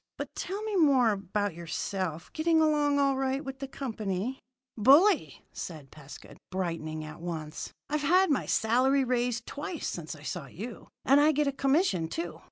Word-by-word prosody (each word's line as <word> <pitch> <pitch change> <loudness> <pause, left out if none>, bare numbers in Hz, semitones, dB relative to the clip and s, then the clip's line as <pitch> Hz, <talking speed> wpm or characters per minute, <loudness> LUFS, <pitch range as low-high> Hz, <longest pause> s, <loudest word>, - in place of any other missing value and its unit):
But - - -6
tell 400 +3 -4
me 435 -2 -2
more 270 -8 +5
about 200 0 -2
yourself. 170 0 -4
Getting 325 0 +2
along 295 -2 +3
all 275 -1 +3
right 270 +2 -1
with 270 0 -6
the 275 - -4
company?" 225 -2 -3 0.4
"Bully," 275 - +4
said 155 -6 -7
Pescud, 150 -1 -12
brightening 165 -4 -3
at 155 +2 -9
once. 160 -3 -5 0.2
"I've 300 0 -1
had 365 +4 +4
my 280 - 0
salary 255 +5 +3
raised 245 -2 0
twice 300 +3 -5
since 160 -2 -5
I 145 - -14
saw 150 -1 -5
you, 215 - -8 0.2
and 275 +2 +6
I 305 +1 +5
get 300 0 +1
a 280 - +1
commission, 275 - +1
too. 330 - -5
250 Hz, 170 wpm, -29 LUFS, 175-290 Hz, 0.4 s, and